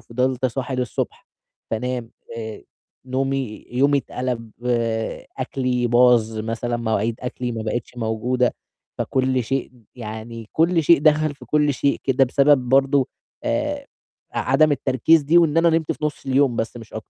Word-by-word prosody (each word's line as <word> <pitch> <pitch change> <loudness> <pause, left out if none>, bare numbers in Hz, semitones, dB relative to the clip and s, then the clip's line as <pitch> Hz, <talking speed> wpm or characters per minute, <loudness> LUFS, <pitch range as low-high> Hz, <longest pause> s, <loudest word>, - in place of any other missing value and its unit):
فضلت 130 +2 -1
صاحي 130 +1 -3
للصبح، 125 -3 -3 0.4
فانام، 120 +1 -3 0.3
آآ، 110 -2 -6 0.4
نومي 135 -3 -2
يومي 140 +3 +3
اتقلب، 125 -3 -4 0.9
أكلي 125 -1 -1
باظ، 120 -2 +4
مثلًا 115 +2 -2
مواعيد 110 -1 0
أكلي 125 -1 -4
ما 110 -1 -4
بقتش 115 +2 -4
موجودة، 120 +2 0 0.4
فكُلّ 130 -1 0
شيء 135 +3 -2 0.2
يعني 110 -1 -7
كُلّ 165 +1 +3
شيء 170 +3 +6
دخل 155 0 +3
في - - -14
كُلّ 150 -1 +2
شيء 140 +2 0
كده، 135 0 +3
بسبب 135 0 +3
برضه 135 0 +3 0.4
آآ، 290 -1 -1 0.5
عدم 155 -1 +3
التركيز 145 +3 +3
دي، 155 +5 +4
وإن 165 -2 +3
أنا 170 0 +5
نمت 160 -1 +1
في - - -6
نُص 150 -1 -3
اليوم 135 -2 +2
بس 115 +1 -3
مش 115 -2 -11
أك 110 - -6
130 Hz, 145 wpm, -22 LUFS, 115-140 Hz, 0.9 s, شيء